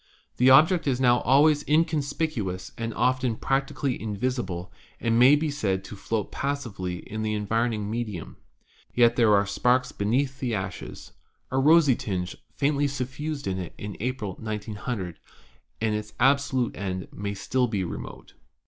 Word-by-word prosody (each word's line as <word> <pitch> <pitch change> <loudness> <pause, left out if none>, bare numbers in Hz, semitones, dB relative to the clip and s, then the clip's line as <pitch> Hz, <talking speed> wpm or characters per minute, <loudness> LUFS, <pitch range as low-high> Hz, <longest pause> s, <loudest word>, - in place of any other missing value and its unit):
The 125 +1 +5
object 160 +5 +6
is 130 -2 +1
now 125 -1 +4
always 145 +3 +4
inconspicuous 145 - 0
and 115 0 -3
often 125 0 +1
prac 135 +4 0
tically 135 -3 -2
invisible, 100 -5 -3 0.3
and 115 0 +2
may 130 +4 +8
be 150 0 -1
said 95 -9 -1
to 105 - -9
float 105 +1 -3
passively 105 -11 -4
in 110 +1 -4
the 110 0 -1
environing 110 0 0
medium. 105 -6 -4 0.6
Yet 120 -1 +5
there 115 -4 +5
are 100 0 +3
sparks 125 +5 +1
beneath 130 +6 0
the 120 -4 -1
ashes. 95 -2 -6 0.4
A 130 - +1
rosy 150 -1 +6
tinge 90 -5 -3 0.2
faintly 145 0 +1
suffused 140 +2 -4
it 95 -3 -4
in 105 -1 -6
April, 115 -5 -3
1900, 105 -3 -4 0.6
and 110 -1 0
its 105 0 -4
absolute 135 -1 +2
end 95 -2 -4
may 100 0 -4
still 125 +5 0
be 100 -4 -1
remote. 85 - -7
120 Hz, 150 wpm, -26 LUFS, 100-135 Hz, 0.6 s, may